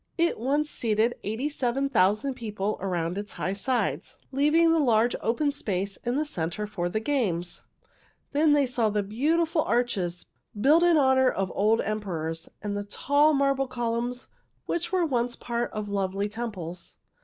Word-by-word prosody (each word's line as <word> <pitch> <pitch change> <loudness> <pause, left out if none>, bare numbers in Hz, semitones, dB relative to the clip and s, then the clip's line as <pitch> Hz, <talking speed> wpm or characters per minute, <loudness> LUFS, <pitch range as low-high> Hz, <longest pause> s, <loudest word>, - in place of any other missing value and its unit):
It 335 -7 +1
once 285 +5 +1
seated 225 -3 +1
eighty 220 +7 -2
seven 275 -2 -1
thousand 215 +3 +2
people 210 -4 -3
around 180 -1 -2
its 205 0 -7
high 190 - -2
sides, 245 +5 -2
leaving 305 +5 +4
a 330 - +3
large 240 -4 +3
open 285 +6 +1
space 200 -8 -2
in 240 +1 -3
the 300 +2 +1
center 185 - -3
for 175 -4 -3
the 215 - -1
games. 205 -10 -1 0.7
Then 295 +1 +4
they 290 -1 +4
saw 245 -3 +1
beautiful 290 - +1
great 335 - -4
arches, 190 -8 -1 0.3
built 295 +9 +5
in 345 -2 +5
honor 265 -2 +4
of 195 -4 -2
old 215 +3 +2
emperors, 165 -6 -3
and 205 0 -3
tall 290 +7 +3
marble 275 -1 +1
columns 240 0 -3 0.4
which 345 0 -2
were 365 -2 +2
once 245 -4 0
a - - -26
part 235 0 -2
of 215 -1 -4
lovely 200 0 -1
temples. 200 -6 -6
235 Hz, 160 wpm, -27 LUFS, 200-280 Hz, 0.7 s, built